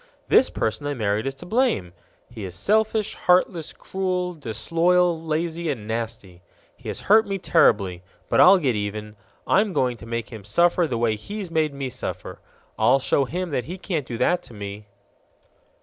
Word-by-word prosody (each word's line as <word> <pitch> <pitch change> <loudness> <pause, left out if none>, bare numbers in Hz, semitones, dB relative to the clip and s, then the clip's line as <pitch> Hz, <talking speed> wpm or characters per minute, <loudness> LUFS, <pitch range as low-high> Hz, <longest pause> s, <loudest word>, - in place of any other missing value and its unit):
"This 260 - +5
person 145 +6 -2
I 145 - -2
married 110 0 -1
is 135 - -3
to 175 - -12
blame. 210 - 0 0.3
He 115 -3 -9
is 90 -2 -6
selfish, 215 - +1
heartless, 180 -2 +2
cruel, 185 -1 -3
disloyal, 165 +7 +1
lazy, 165 +1 -2
and 115 -7 -4
nasty. 110 -5 -5 0.3
He - - -13
has - - -4
hurt 220 +2 +4
me 195 -1 -2
terribly, 100 - +2 0.3
but - - +1
I'll 190 +2 +8
get 135 -9 0
even. 105 +1 -4 0.3
I'm 205 0 +2
going 125 -5 0
to 115 - -12
make 115 -1 -4
him 110 -3 -8
suffer 170 - +2
the 125 -5 -2
way 115 -1 +1
he's 195 - -7
made 155 -3 0
me 135 -2 -4
suffer. - - -6 0.4
I'll 130 - +5
show 135 +1 +1
him 180 +4 -4
that 125 -3 -1
he 180 +4 -6
can't 165 -7 -3
do 120 - -5
that 180 +8 +2
to 120 -4 -14
me!" 100 +1 -7
145 Hz, 180 wpm, -23 LUFS, 110-180 Hz, 0.4 s, I'll